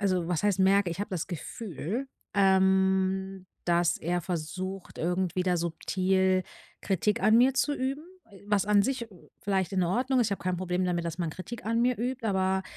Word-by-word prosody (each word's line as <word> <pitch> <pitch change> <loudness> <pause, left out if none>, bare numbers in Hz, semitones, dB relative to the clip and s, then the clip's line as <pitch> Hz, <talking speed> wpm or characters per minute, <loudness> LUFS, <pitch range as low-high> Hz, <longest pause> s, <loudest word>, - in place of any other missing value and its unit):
also 185 -4 +1
was 175 -1 0
heißt 205 -2 +2
merke, 195 -1 +4
ich 170 - -5
habe 205 - -4
das 180 -4 -2
Gefühl, 195 - -5 0.3
ähm, 190 0 +2 0.2
dass 175 0 +2
er 175 +2 -1
versucht, 185 +3 -5
irgendwie 180 +1 0
da 180 -1 +2
subtil 185 +2 +1 0.4
Kritik 210 +4 0
an 215 +1 +5
mir 255 +2 +4
zu 295 - +1
üben, 270 +2 -2 0.3
e 195 - -15
was 205 -1 +2
an 205 -1 +5
sich 255 0 -2 0.4
vielleicht 190 -3 0
in 185 -2 +2
Ordnung 250 +9 +1
ist, 230 - +3
ich - - -2
habe 200 - -4
kein 180 0 -1
Problem 180 0 -1
damit, 175 -1 -1
dass 170 +1 -4
man 170 -2 -1
Kritik 185 +8 -8
an 230 +1 +1
mir 250 +1 +2
übt, 250 0 -2
aber 190 -1 +1
190 Hz, 190 wpm, -28 LUFS, 180-210 Hz, 0.4 s, an